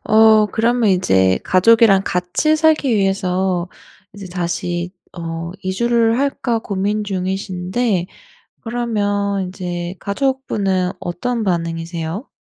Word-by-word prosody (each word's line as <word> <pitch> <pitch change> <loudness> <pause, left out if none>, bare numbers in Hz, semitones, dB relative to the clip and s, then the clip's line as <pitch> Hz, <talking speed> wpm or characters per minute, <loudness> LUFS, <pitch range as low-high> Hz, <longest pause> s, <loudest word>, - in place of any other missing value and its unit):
어 220 0 +6
그러면 230 +1 +1
이제 95 - +3
가족이랑 200 +1 +5
같이 180 - +1
살기 310 -5 +3
위해서 190 -2 0 0.4
이제 200 -2 -9
다시 175 0 -3 0.3
어 165 0 -5
이주를 230 +4 +1
할까 270 -4 0
고민 210 0 -2
중이신데 190 +1 -2 0.6
그러면 205 -5 -1
이제 175 -1 -5
가족분은 200 -6 -1
어떤 230 +7 -2
반응이세요? 165 - -3
195 Hz, 235 characters per minute, -19 LUFS, 180-225 Hz, 0.6 s, 어